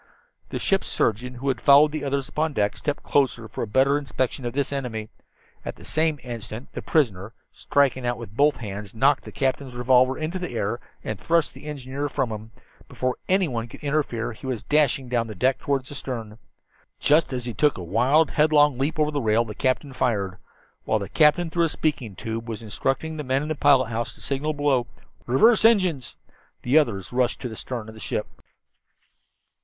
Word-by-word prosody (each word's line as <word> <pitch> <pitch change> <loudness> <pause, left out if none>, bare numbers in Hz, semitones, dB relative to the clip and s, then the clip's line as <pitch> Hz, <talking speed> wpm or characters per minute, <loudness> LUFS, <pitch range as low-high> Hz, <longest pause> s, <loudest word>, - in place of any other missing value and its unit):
The - - -3
ship's 195 -1 +1
surgeon, 125 +3 0
who 130 +3 -6
had 130 - -1
followed 145 +2 +7
the 155 -1 -4
others 140 -1 -1
upon 155 0 -1
deck, 105 -4 0
stepped 145 -1 -3
closer 130 -5 +1
for - - -6
a - - -2
better 135 +6 +3
inspection 130 -1 -3
of 120 - -4
this 140 +1 -1
enemy. 115 -6 -4 0.5
At - - -5
the 85 - -14
same 155 +6 0
instant 120 0 -6
the - - -5
prisoner, 110 - 0 0.2
striking 135 -2 +1
out 120 -1 -1
with 115 -3 -10
both 145 +2 +4
hands, 105 -2 -7
knocked 135 +4 +3
the - - -8
captain's 130 -1 -2
revolver 130 +1 +4
hand 155 +4 -3
into 185 - -3
the 180 -9 -5
air, 115 +2 -1 0.2
and 110 -3 -4
thrust 165 - +1
the 135 - -13
engineer 140 0 -4
from 135 -5 -1
him. 110 +1 -7 0.4
Before 130 -1 -2
anyone 155 -12 +1
could - - -13
interfere 140 -6 -1
he 120 - -10
was 125 -4 -3
dashing 145 -3 +2
down 120 -2 0
the 110 - -7
deck 130 +7 +1
toward 135 -2 -1
the 140 - -9
stern. 115 -6 -6 0.6
Just 150 +2 +3
as 125 -2 -3
he 120 - -4
took 145 +8 +2
a 90 - -6
wild, 125 - +3
headlong 150 -3 +4
leap 150 +4 -1
over 150 -1 +2
the 145 -1 -1
rail 110 +1 +2
the 105 - -7
captain 130 +3 -1
fired. 100 -8 -1 0.4
While 110 - +1
the 100 -2 -5
captain, 160 +2 +3
through 170 0 +2
a - - 0
speaking 140 -10 -2
tube, 115 +2 -5
was 115 0 -5
instructing 135 +8 -2
the 150 - -3
man 135 +1 0
in 150 - -5
the - - +1
pilot 140 -4 +4
house 115 0 -3
to 105 - -16
signal 140 +6 -1
below 140 -4 +1 0.4
"Reverse 220 - +5
engines," 185 - +3 0.5
the 135 +6 +5
others 110 -8 -2
rushed 125 -1 +1
to 125 - -4
the 110 - -8
stern 115 -1 -5
of 110 - -9
the 110 - -12
ship. 105 - -2
130 Hz, 200 wpm, -24 LUFS, 115-145 Hz, 0.6 s, followed